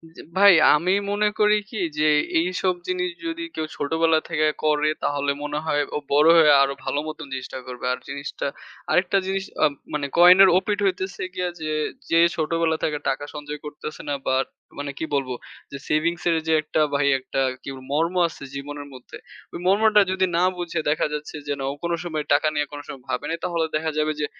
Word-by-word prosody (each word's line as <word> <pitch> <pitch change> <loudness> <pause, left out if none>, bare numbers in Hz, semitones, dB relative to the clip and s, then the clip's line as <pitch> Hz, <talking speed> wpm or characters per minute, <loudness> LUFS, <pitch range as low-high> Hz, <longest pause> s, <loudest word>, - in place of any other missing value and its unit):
জ্বী - - -10 0.2
ভাই। 200 -1 +8 0.2
আমি 180 +5 +1 0.2
মনে 210 +1 +2
করি 210 0 +5
কি 220 - -7 0.2
যে 155 0 +3 0.3
এইসব 180 +1 0
জিনিস 180 0 -1 0.2
যদি 330 0 -4
কেউ 155 - -2
ছোটবেলা 160 +2 +2
থেকে 155 0 +2 0.2
করে। 150 0 +2
তাহলে 145 0 0
মনে 150 0 -3
হয় 145 -2 +1
ও - - +1
বড় 150 +3 +5
হয়ে 155 -2 +7
আরো 140 0 +2
ভালো 145 - -1
মত 155 - -6
জিনিসটা 130 0 -5
করবে। 125 0 -7
আর - - -5
জিনিসটা 140 0 -5 0.4
আরেকটা 190 +2 +3
জিনিস 195 0 -1 0.2
আ - - +8 0.3
মানে 145 -1 -1
কয়েনের 185 +2 +8
ওপিঠ 205 +2 -1
হইতেছে 190 -1 -2
গিয়া 180 -1 -2
যে, 155 - -3 0.4
যে 165 - +3 0.2
ছোটবেলা 160 0 0
থেকে 150 -1 0
টাকা 140 +2 -2
সঞ্চয় 150 0 -6
করতেছে 150 +1 -7
না, - - 0
বাট 130 +1 +2 0.3
মানে 145 0 -4
কি - - -3
বলব 135 -2 -1 0.4
যে 140 - -5
সেভিংস 170 +3 0
এর 165 - +3
যে 160 - +3
একটা 155 0 -1
ভাই 140 0 +2
একটা 135 +1 -3 0.2
কি - - -6 0.2
মর্ম 165 +4 +1
আছে 165 - -11
জীবনের 145 +1 -6
মধ্যে 125 -1 -11 0.4
ঐ - - -7
মর্মটা 210 +2 +5
যদি 190 0 +2
না 175 - +3
বুঝে 170 -2 -3
দেখা 155 - +1
যাচ্ছে 150 +1 -5
যে 145 - 0
না - - -3
ও - - -5
কোন 170 - -1
সময় 155 -3 -3
টাকা 150 +2 +3
নিয়ে 150 0 0
কোন 145 - -7
সময় 130 -3 -9
ভাবে 125 -1 -2
নাই। 165 - -2
তাহলে 170 -2 0
দেখা 160 0 -1
যাবে 155 0 +1
যে 150 - +1
155 Hz, 200 wpm, -23 LUFS, 145-180 Hz, 0.4 s, ভাই